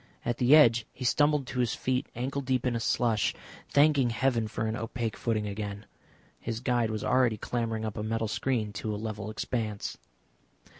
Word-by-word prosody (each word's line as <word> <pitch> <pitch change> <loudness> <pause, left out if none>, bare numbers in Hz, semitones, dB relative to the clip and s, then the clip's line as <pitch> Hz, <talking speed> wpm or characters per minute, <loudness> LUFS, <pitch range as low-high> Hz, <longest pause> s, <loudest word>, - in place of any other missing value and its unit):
At 120 0 -1
the 130 +4 +6
edge 120 -6 +5
he 130 - -7
stumbled 145 +2 +3
to 125 0 -4
his 120 -2 +1
feet 130 0 -1
ankle 135 +4 -2
deep 130 -1 0
in 120 -2 +1
slush, 115 -4 +1 0.3
thanking 145 -3 +4
heaven 115 -1 +1
for 110 +1 -3
an 110 0 -1
opaque 115 0 -3
footing 110 -3 -1
again. 100 0 -5 0.5
His 115 -1 -4
guide 120 -3 +1
was 110 -1 -3
already 125 -3 +3
clambering 115 0 -2
up 110 0 -4
a - - -2
metal 110 +1 -1
screen 105 +1 -1
to 105 +1 -3
a - - -4
level 110 -1 -5
expanse. 110 -1 -3
115 Hz, 180 wpm, -29 LUFS, 110-125 Hz, 0.5 s, the